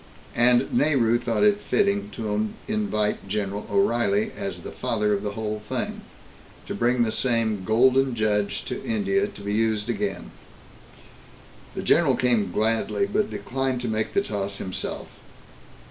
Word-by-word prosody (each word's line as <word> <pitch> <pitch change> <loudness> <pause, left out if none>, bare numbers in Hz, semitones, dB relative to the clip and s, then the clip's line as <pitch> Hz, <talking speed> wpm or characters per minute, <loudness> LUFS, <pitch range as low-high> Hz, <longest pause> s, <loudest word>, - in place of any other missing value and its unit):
And 120 +1 +4
Nehru 120 -6 +3
thought 120 - 0
it 205 -1 +4
fitting 205 0 +1
to 110 -1 -1 0.2
invite 205 - -1
General 100 0 -3
O'Reilly, 120 - +2
as - - -5
the - - -8
father 105 -2 0
of 100 - -1
the 105 -1 -4
whole 105 0 -4
thing, - - -3 0.6
to - - -5
bring 120 +1 +2
the 110 - 0
same 115 -5 +1
"Golden 130 +4 +3
Judge" 105 -2 0
to - - -5
India, 205 -3 +1
to 205 - -12
be 100 0 -3
used 110 0 +1
again. 100 -5 -3 1.4
The - - -4
general - - +4
came 115 -7 +1
gladly, 110 - +1
but 205 +1 0
declined 130 +5 -2
to 125 - -3
make 110 -1 -2
the 200 - +3
toss 100 - -3
himself. 95 -1 -5
115 Hz, 145 wpm, -25 LUFS, 105-135 Hz, 1.4 s, And